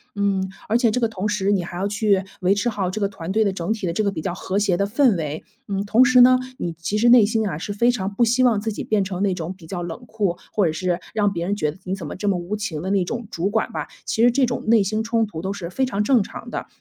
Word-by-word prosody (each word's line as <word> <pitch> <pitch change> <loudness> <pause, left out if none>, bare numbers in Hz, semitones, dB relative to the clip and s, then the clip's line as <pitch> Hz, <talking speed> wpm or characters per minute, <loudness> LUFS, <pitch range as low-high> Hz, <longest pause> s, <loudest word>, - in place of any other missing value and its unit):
嗯， 195 -2 0 0.2
而 225 - +4
且 235 -3 +3
这 250 - 0
个 230 - +3
同 210 -2 -3
时 205 -1 0
你 195 -3 +1
还 175 - -8
要 195 +3 -1
去 205 -2 +1 0.2
维 185 +2 +3
持 205 +4 0
好 195 -5 -2
这 215 - -4
个 200 - +2
团 185 -2 -6
队 220 +2 +3
的 200 - +1
整 190 +3 -2
体 210 -5 -4
的 170 - -1
这 215 - 0
个 200 - +1
比 160 - -5
较 180 - -2
和 190 +3 -2
谐 195 -4 +1
的 200 - +1
氛 235 +1 +3
围。 155 -1 -4 0.2
嗯， 195 0 -2
同 230 +5 +5
时 250 0 +6
呢， 255 +1 +7 0.2
你 170 - -2
其 200 +6 -2
实 240 +1 +4
内 240 -3 +8
心 220 0 0
啊， 165 - -3
是 200 +5 -5
非 235 +4 +3
常 200 -5 -1
不 235 +4 +2
希 245 +3 +3
望 225 -5 +3
自 220 - -2
己 205 - -5
变 210 -2 +1
成 190 0 -3
那 195 - +2
种 180 +1 -5
比 175 - -14
较 175 +2 -5
冷 175 +8 -6
酷， 200 -6 -1
或 200 -5 +2
者 - - 0
是， 175 +2 -1 0.2
让 205 -2 +2
别 170 -2 -3
人 205 - 0
觉 155 -6 -1
得 160 - -15
你 185 - -2
怎 175 -5 -8
么 - - -6
这 205 +2 -1
么 185 - +1
无 175 +4 -4
情 190 -8 -4
的 190 - -2
那 195 -2 +2
种 235 +2 -5
主 180 +4 -1
管 - - -1
吧。 - - -4 0.2
其 220 - -1
实 240 - +7
这 260 +2 +3
种 240 0 -3
内 225 -2 +5
心 215 +3 -1
冲 225 0 +1
突 165 -6 -7
都 190 - -3
是 185 -4 -5
非 265 - -1
常 210 -5 0
正 245 +1 +4
常 195 - -8
的。 - - -4
200 Hz, 330 characters per minute, -22 LUFS, 185-220 Hz, 0.2 s, 内